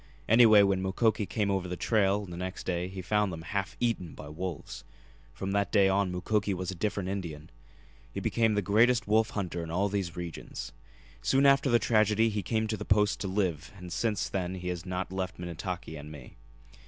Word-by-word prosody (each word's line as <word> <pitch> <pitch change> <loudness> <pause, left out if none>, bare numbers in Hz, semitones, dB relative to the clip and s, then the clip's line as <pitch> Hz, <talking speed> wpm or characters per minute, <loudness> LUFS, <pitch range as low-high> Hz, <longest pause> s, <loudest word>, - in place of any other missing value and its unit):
Anyway, 110 -2 +7
when 100 -1 +2
Mukoki 105 +2 +1
came 105 -3 0
over 95 -2 -1
the 90 - -3
trail 100 -1 +2
the 90 -2 -8
next 90 +1 -5
day 90 -1 -1
he 95 0 -7
found 105 +1 +1
them 80 -1 -7
half 100 +1 -3
eaten 115 -9 -1
by - - -9
wolves. 80 -7 -6 0.5
From 95 +10 -4
that 100 -1 0
day 100 -3 +5
on 95 -1 +1
Mukoki 100 +2 0
was 90 +1 -3
a - - -5
different 100 +1 -2
Indian. 85 -5 -5 0.6
He - - -4
became 110 -2 +1
the 105 - +1
greatest 115 +5 +3
wolf 110 +1 +3
hunter 90 -3 -2
in 85 - -6
all 95 +5 0
these 95 -4 -2
regions. 85 -8 -6 0.5
Soon 135 +1 +3
after 140 0 +5
the 120 - +5
tragedy 110 0 +3
he 105 -1 -2
came 110 +3 0
to 110 0 -2
the - - -5
Post 105 0 +2
to 100 - -3
live 90 -5 -1
and 90 -2 -8
since 105 -1 0
then 95 -1 -3
he 90 -1 -5
has 90 0 -5
not 90 0 -3
left 95 -1 -3
Minnetaki 85 -1 -5
and 75 0 -9
me. 70 -5 -11
95 Hz, 205 wpm, -29 LUFS, 90-105 Hz, 0.6 s, Anyway